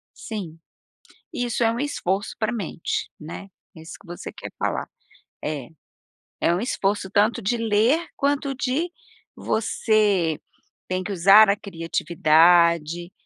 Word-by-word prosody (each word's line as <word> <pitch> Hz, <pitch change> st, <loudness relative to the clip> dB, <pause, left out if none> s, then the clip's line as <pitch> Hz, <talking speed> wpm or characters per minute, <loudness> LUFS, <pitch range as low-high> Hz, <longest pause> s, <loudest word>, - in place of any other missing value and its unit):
Sim, 185 Hz, -8 st, -7 dB, 0.7 s
isso 240 Hz, -1 st, -1 dB
é 225 Hz, -, +4 dB
um 235 Hz, -, -4 dB
esforço 200 Hz, -9 st, -2 dB
pra 220 Hz, 0 st, 0 dB
mente, 195 Hz, -7 st, -3 dB
né, 165 Hz, +5 st, -9 dB, 0.3 s
é -, -, -11 dB
isso 160 Hz, -, -10 dB
que 200 Hz, -, -19 dB
você 175 Hz, 0 st, -8 dB
quer -, -, -9 dB
falar, -, -, -2 dB, 0.6 s
eh, 150 Hz, -3 st, -4 dB, 0.7 s
é 170 Hz, -, +2 dB
um -, -, -1 dB
esforço 200 Hz, -5 st, -1 dB
tanto 215 Hz, +4 st, +2 dB
de 235 Hz, +5 st, 0 dB
ler 230 Hz, +7 st, +3 dB, 0.2 s
quanto 280 Hz, -1 st, 0 dB
de 280 Hz, +7 st, -1 dB, 0.5 s
você 205 Hz, -7 st, +1 dB, 0.5 s
tem 185 Hz, 0 st, -2 dB
que 205 Hz, -, -5 dB
usar 200 Hz, +3 st, +7 dB
a 200 Hz, -, +4 dB
criatividade, 170 Hz, -1 st, +2 dB
200 Hz, 130 wpm, -23 LUFS, 170-230 Hz, 0.7 s, usar